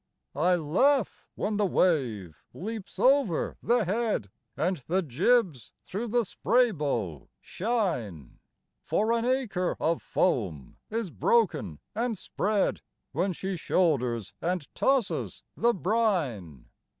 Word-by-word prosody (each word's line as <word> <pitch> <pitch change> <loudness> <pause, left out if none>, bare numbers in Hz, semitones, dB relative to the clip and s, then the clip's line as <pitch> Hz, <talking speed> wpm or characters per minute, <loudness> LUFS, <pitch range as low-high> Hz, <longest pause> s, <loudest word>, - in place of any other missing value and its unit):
I 180 +5 +3
laugh 205 - +1
when 210 0 -1
the 210 - +2
wave 120 - 0
leaps 215 +1 -6
over 255 - +2
the 240 -2 +2
head 210 - -1 0.3
And 180 +3 0
the 185 +3 +1
jibs 165 - +1
thro' 215 +6 -4
the 235 +1 +1
spray 240 +6 +2
bow 120 - -3
shine, 170 - -3 0.4
For 220 +2 +1
an 230 0 0
acre 245 -9 0
of 165 +1 0
foam 90 - -1
is 220 -5 -3
broken 150 - +1 0.2
and 230 0 -1
spread 205 +2 0 0.3
When 180 +7 0
she 190 +2 -4
shoulders 125 - 0
and 175 -3 -1
tosses 265 -6 0
the 235 - +3
brine. 170 - -1
185 Hz, 115 wpm, -28 LUFS, 135-225 Hz, 0.4 s, I